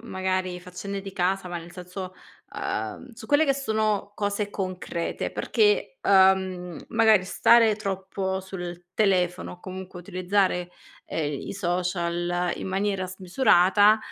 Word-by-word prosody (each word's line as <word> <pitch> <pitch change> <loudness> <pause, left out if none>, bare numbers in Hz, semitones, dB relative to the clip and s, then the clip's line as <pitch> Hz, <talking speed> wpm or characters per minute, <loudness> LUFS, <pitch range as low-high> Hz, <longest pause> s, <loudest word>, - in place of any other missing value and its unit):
magari 185 -3 -2
faccende 185 +3 -6
di 195 0 -8
casa, 185 +1 0
ma 175 -1 -4
nel 170 +1 -11
senso, 180 +1 -7 0.4
ehm, 110 - -4
su 225 0 -11
quelle 290 +4 +4
che 275 - +3
sono 215 -6 -1
cose 205 0 -2
concrete, 185 -3 -3
perché, 450 +4 +1
ehm, 190 -2 +3
magari 220 -4 +4
stare 225 +3 +5
troppo 190 -1 -3
sul 175 -2 -7
telefono 185 -4 +1
o 180 - -13
comunque 185 -1 -8
utilizzare, 185 -1 0 0.4
ehm, 150 -3 -2
i - - -4
social 175 -1 -1
in - - -5
maniera 195 0 -1
smisurata, 190 +2 +4
190 Hz, 125 wpm, -26 LUFS, 180-205 Hz, 0.4 s, stare